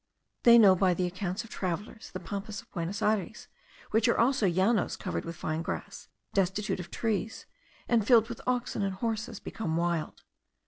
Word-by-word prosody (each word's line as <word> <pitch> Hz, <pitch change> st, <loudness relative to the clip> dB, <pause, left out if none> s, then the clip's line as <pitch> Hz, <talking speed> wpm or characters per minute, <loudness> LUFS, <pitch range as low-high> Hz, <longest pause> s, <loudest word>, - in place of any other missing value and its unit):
They 235 Hz, -1 st, +8 dB
know 200 Hz, -5 st, +8 dB
by 185 Hz, -1 st, +3 dB
the 180 Hz, -, 0 dB
accounts 185 Hz, +3 st, -3 dB
of 225 Hz, -, -14 dB
travellers 195 Hz, +5 st, -4 dB
the 185 Hz, -, -6 dB
Pampas 200 Hz, +2 st, -5 dB
of -, -, -15 dB
Buenos 185 Hz, +5 st, -3 dB
Ayres, 210 Hz, -1 st, -1 dB, 0.4 s
which 220 Hz, 0 st, +3 dB
are -, -, +3 dB
also 240 Hz, -3 st, +3 dB
Llanos 190 Hz, +4 st, +2 dB
covered -, -, -4 dB
with 170 Hz, 0 st, -6 dB
fine 155 Hz, +1 st, -3 dB
grass, -, -, -6 dB, 0.3 s
destitute 195 Hz, +1 st, 0 dB
of 180 Hz, -, -7 dB
trees, 220 Hz, -1 st, -2 dB, 0.4 s
and 235 Hz, -3 st, +3 dB
filled 230 Hz, -3 st, +6 dB
with 235 Hz, -1 st, -7 dB
oxen 245 Hz, -3 st, 0 dB
and 195 Hz, -1 st, -1 dB
horses 220 Hz, +1 st, -3 dB
become 165 Hz, -7 st, -3 dB
wild. 170 Hz, -2 st, -2 dB
200 Hz, 175 wpm, -29 LUFS, 180-225 Hz, 0.4 s, They